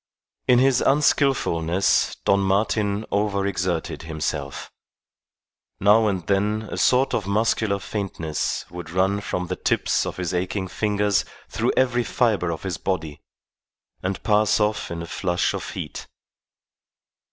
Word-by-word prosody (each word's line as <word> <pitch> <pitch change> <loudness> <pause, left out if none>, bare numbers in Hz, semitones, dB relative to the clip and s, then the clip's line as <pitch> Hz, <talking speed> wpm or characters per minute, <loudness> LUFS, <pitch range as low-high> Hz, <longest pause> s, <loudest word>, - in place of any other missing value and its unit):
In 125 - +6
his 130 0 +4
unskilfulness 125 - +2
Don 100 - +4
Martin 100 +2 +1
over 100 -1 0
exerted 90 -3 -2
himself. 75 -3 -4 1.1
Now 105 +3 +5
and 95 -5 -1
then 105 +2 +1
a - - -4
sort 130 +2 +3
of 100 -4 -1
muscular 105 0 +1
faintness 95 -7 -3
would 90 -2 -7
run 95 +4 +1
from 90 -2 -3
the 90 +1 -3
tips - - 0
of - - -5
his 90 0 -3
aching 95 +2 -2
fingers 105 0 +1 0.3
through - - 0
every 125 -2 +2
fibre 110 -8 +1
of 80 - -6
his 95 -3 -3
body, 80 -6 -3 0.8
and 95 0 -3
pass 105 0 +3
off 105 0 0
in 85 0 -5
a - - -5
flush 90 +1 -1
of - - -5
heat. - - -6
100 Hz, 135 wpm, -23 LUFS, 90-105 Hz, 1.1 s, In